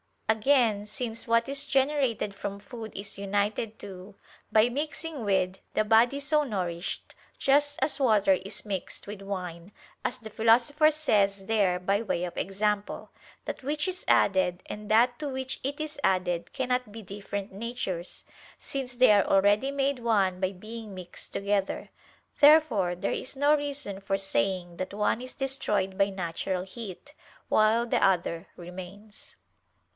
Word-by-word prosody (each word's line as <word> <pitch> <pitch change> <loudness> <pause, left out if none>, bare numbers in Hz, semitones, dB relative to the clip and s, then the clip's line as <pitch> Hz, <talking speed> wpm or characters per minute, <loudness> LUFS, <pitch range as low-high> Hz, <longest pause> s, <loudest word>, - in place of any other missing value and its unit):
Again, 220 -2 +3
since 225 +2 -5
what 230 +1 +3
is 280 +1 +1
generated 270 -7 +1
from 200 0 -5
food 220 +2 -9
is 200 0 -6
united 205 +2 -1
to, 190 0 -9 0.4
by 220 +1 +5
mixing 300 +1 -4
with, 190 -1 +1
the - - +2
body 230 +5 +4
so 300 +1 +2
nourished, 180 -8 -3 0.2
just 290 +1 +3
as 300 - +1
water 215 -7 +4
is 190 +3 -4
mixed 195 -3 -4
with 205 -1 -8
wine, 185 -2 -6 0.3
as - - -1
the 220 -3 -10
Philosopher 240 +8 +4
says 200 -11 +1
there 195 -4 +2
by 195 +3 +1
way 185 -6 -1
of 180 - -4
example: 205 +1 -2 0.3
that - - -5
which 295 +4 -1
is 370 0 -4
added, 185 -2 +3
and 210 0 -7
that 240 +3 +4
to 300 - -3
which 260 -1 -3
it 285 +3 -3
is 305 -1 -5
added, 180 -2 +1
cannot 250 -3 -1
be 225 - -7
different 200 +1 -6
natures, 195 -5 -4 0.3
since 260 -2 -5
they 255 -2 +6
are 205 -2 +5
already 205 +6 +3
made 275 -1 0
one 200 -6 +2
by 190 0 0
being 215 +1 -8
mixed 180 -1 -7
together. 200 -1 -1 0.5
Therefore 285 - +5
there 180 - -2
is 260 - -4
no 285 +2 +4
reason 285 -9 -2
for 195 0 -1
saying 180 0 -1
that 185 +1 -4
one 210 +2 +1
is 255 0 -7
destroyed 210 -8 0
by 195 0 +3
natural 180 0 -3
heat, 215 +7 -9 0.4
while 220 +2 +4
the 240 - +1
other 175 -2 +1
remains. 185 +4 -10
210 Hz, 150 wpm, -28 LUFS, 195-255 Hz, 0.5 s, they